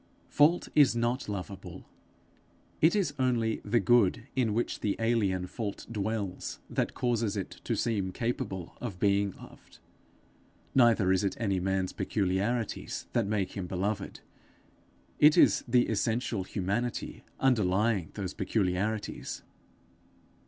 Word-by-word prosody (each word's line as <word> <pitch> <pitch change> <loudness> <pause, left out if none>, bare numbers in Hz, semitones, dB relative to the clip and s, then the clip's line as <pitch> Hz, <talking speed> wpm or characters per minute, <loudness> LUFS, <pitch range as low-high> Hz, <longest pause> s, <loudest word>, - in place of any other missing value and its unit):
Fault 155 +4 +4
is 145 -5 +5
not 120 +1 -1
lovable; 95 -2 -7 0.9
it 160 +6 +5
is 185 -9 +1
only 120 -4 +1
the 115 +3 +2
good 120 0 +3
in 125 -4 +1
which 115 +3 -1
the 105 - 0
alien 105 -6 +1
fault 100 +1 -5
dwells 105 -3 -3
that - - -1
causes 115 -4 0
it 95 - -4
to - - 0
seem 100 -5 -1
capable 95 -6 -3
of 105 -7 -5
being 100 0 +2
loved. - - -15 1.0
Neither 115 -7 +4
is 95 +1 +2
it 100 - -1
any 100 -5 0
man's 95 0 -1
peculiarities 105 +4 -1
that 115 -4 +1
make 100 -3 -1
him 95 -3 -5
beloved; 95 +2 -3 1.0
it 150 +1 +7
is - - +5
the 120 0 +3
essential 110 -2 -1
humanity 100 +6 -3 0.2
underlying 105 - +2
those 95 -3 -4
peculiarities. 100 +1 -2
105 Hz, 125 wpm, -29 LUFS, 95-120 Hz, 1.0 s, it